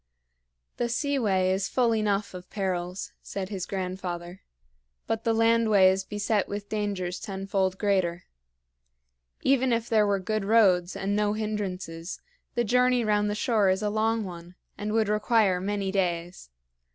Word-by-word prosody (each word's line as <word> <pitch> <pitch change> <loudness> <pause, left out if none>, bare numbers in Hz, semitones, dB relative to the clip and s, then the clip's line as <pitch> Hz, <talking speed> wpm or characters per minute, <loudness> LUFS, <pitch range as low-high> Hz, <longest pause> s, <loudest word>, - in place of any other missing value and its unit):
"The 240 - -1
seaway 230 -9 +1
is 190 +1 -1
full 240 -3 +2
enough 210 -2 0
of 180 0 -9
perils," 185 -2 -3
said 190 -1 -5
his 195 -3 -4
grandfather, 180 -2 -5 0.6
"but 225 0 -2
the 230 - +3
landway 225 -4 +4
is 190 0 -1
beset 205 +1 -1
with 205 0 -5
dangers 200 -4 -2
tenfold 195 -1 -2
greater. 185 -4 0 1.2
Even 260 -1 +3
if 230 0 0
there 215 -2 +4
were 200 -1 +2
good 215 +2 -2
roads 195 -4 +3
and 195 +1 -1
no 210 0 +1
hindrances, 190 -5 -4 0.4
the 240 - +2
journey 250 +1 +3
round 210 -1 +2
the 205 - -1
shore 210 -3 +2
is 190 +2 +1
a 210 - 0
long 220 +1 +1
one 175 -1 -9 0.2
and 210 +1 -4
would 220 -1 +2
require 210 -3 +2
many 200 0 -2
days. 175 - -2
200 Hz, 150 wpm, -27 LUFS, 185-220 Hz, 1.2 s, landway